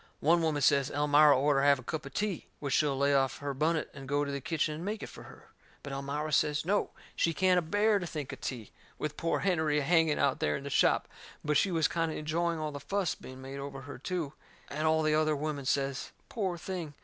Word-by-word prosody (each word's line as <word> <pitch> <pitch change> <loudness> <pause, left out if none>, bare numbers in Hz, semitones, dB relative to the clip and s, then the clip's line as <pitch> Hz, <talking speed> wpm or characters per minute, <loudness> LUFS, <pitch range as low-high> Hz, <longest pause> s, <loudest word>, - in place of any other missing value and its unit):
One 170 +3 +4
woman 155 -3 0
says 140 -1 +4
Elmira 145 0 +5
orter 140 0 +3
have 140 0 +5
a 130 - -11
cup 155 +2 -4
o' - - -7
tea, 205 +3 -3
which 140 -2 -2
she'll 145 -3 +2
lay 140 +1 +3
off 135 -1 +2
her 145 -1 -4
bunnet 155 +3 0
and 135 -1 -9
go 145 +1 +1
to 140 - -4
the 140 0 -3
kitchen 150 +3 -1
and 155 +3 -6
make 210 +2 -3
it - - -6
fur - - -11
her. - - -15 0.3
But 140 - -6
Elmira 145 +3 -3
says 150 +1 +2
no, 205 +3 +1 0.3
she 165 -1 +1
can't 185 0 +4
a - - -1
bear 205 +5 +2
to 175 - -4
think 150 -5 -5
of - - -10
tea, 120 -6 -5 0.3
with 150 -1 -3
poor 165 - -1
Hennerey 160 -5 +1
a 145 - +1
hanging 160 0 +3
out 140 -2 +1
there 75 0 +1
in - - -9
the - - -6
shop. - - +3 0.4
But 150 -1 +3
she 200 - +3
was 165 -4 +2
kind 165 -1 -1
o' - - -5
enjoying 165 +2 -1
all 155 -1 -3
that 145 - -6
fuss 195 -1 -1
being 130 0 -11
made 135 +1 -7
over 140 -1 -6
her, 140 -1 -9
too. 160 -1 -3 0.4
And 155 +2 -1
all 160 0 +3
the 155 0 +2
other 155 0 +2
women 145 -1 -3
says: 135 0 -1 0.2
"Poor 190 -6 -2
thing!" 170 -4 -5
150 Hz, 245 wpm, -30 LUFS, 140-165 Hz, 0.4 s, Elmira